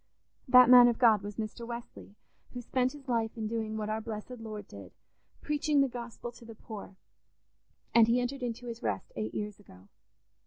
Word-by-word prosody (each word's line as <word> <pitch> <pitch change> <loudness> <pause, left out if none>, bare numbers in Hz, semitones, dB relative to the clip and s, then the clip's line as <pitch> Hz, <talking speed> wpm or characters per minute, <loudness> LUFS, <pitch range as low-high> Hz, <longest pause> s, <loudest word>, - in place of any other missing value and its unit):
"That 250 -1 +8
man 245 0 +9
of 235 -1 +1
God 225 -5 +5
was 205 +1 -7
Mr. 220 +1 -5
Wesley, 235 -3 -9 0.4
who 245 - -4
spent 255 +2 0
his 285 -2 -13
life 230 -2 -1
in 220 - -3
doing 220 0 -3
what 215 -1 -3
our 215 +1 -2
blessed 225 +2 -7
Lord 215 -2 -7
did—preaching 285 - -3
the 275 - +3
Gospel 240 -1 -7
to 240 - -16
the 230 -1 -11
poor—and 220 +2 -4
he 235 +2 +3
entered 250 +2 -3
into 245 0 -4
his 235 -1 -7
rest 105 -3 -3
eight 110 0 -4
years 210 -1 -4
ago. 95 - -18
230 Hz, 180 wpm, -30 LUFS, 210-245 Hz, 0.4 s, man